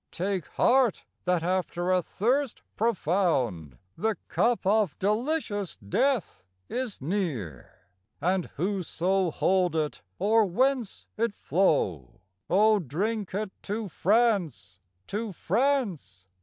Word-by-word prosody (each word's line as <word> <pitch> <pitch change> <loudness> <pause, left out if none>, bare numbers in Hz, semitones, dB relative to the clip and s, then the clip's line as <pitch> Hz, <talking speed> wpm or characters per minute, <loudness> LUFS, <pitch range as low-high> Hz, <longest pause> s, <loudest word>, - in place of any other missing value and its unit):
Take 185 -1 -2
heart, 250 -5 +2 0.2
that 180 -2 +1
after 180 0 0
a 185 -1 +3
thirst 250 - -1
profound 155 - 0 0.2
The 220 0 0
cup 235 -3 +1
of 200 -5 +2
delicious 210 - -1
death 235 - 0 0.2
is 250 -5 -4
near, 140 - -4 0.3
And 180 +3 0
whoso 185 +1 0
hold 180 +1 +1
it, 155 -2 -1 0.2
or 220 +1 +4
whence 250 +3 0
it 225 -2 0
flow, 95 - 0 0.3
O 210 +3 +5
drink 195 - -2
it 210 -1 -2
to 210 0 -4
France, 175 - +1 0.3
to 210 +1 -4
France! 190 - -1
190 Hz, 105 wpm, -27 LUFS, 165-220 Hz, 0.3 s, O